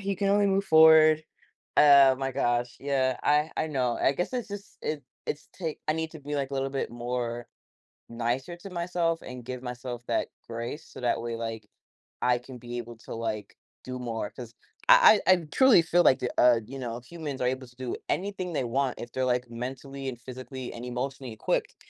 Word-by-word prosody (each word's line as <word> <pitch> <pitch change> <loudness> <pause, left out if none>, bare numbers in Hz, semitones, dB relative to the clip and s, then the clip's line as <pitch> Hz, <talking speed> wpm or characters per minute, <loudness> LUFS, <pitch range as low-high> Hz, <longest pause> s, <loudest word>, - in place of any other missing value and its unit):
you 195 -1 -1
can 200 0 0
only 205 0 +4
move 195 0 +2
forward. 160 -1 +7 0.5
Oh 140 -2 +8
my 135 0 -2
gosh, 120 -2 0
yeah, 130 -2 +1
I 150 +2 +3
I 160 - 0
know, 130 -5 -1
I 135 - +4
guess 175 - -2
it's 245 -4 -3
just, 205 0 -9
it 150 -2 -3 0.2
it's 150 - -4
t 165 -4 -4
I - - +4
need 160 0 -3
to 160 - -10
be 145 +1 -5
like 140 -1 -2
a - - -4
little 135 0 -1
bit 135 -3 -2
more 120 0 -3 0.6
nicer 120 +7 -2
to 195 +3 -10
myself 170 -1 -1
and 125 -2 -9
give 125 -1 -5
myself 125 -1 -6
that 115 - 0 0.2
grace, 120 +7 -5
so - - -11
that 120 -1 +1
way, 115 0 -3
like, 115 -2 -5 0.5
I 125 0 +3
can 125 +1 -11
be 120 0 -7
able 120 -1 -8
to, - - -9
like, 110 -3 -4 0.3
do 130 0 -6
more 115 -4 -4
'cause 120 -2 -10 0.4
I - - +8
I 185 - +9
I - - +3
truly 260 -10 +6
feel 175 +2 +3
like 135 - +6
the, 125 - -2
uh, 120 -2 +6
you 135 +3 -8
know, 120 -2 -4
humans 150 -1 -6
are 125 - +2
able 130 0 -2
to 120 - -20
do 125 -1 -4
anything 185 -2 -2
they 140 - 0
want 130 +2 -1
if 120 - -7
they're 130 +1 -1
like 125 -1 0
mentally 135 +3 -5
and 120 -2 -8
physically 130 +1 -8
and 120 - -8
emotionally 125 0 -4
equipped. 110 - -1
130 Hz, 210 wpm, -28 LUFS, 120-155 Hz, 0.6 s, I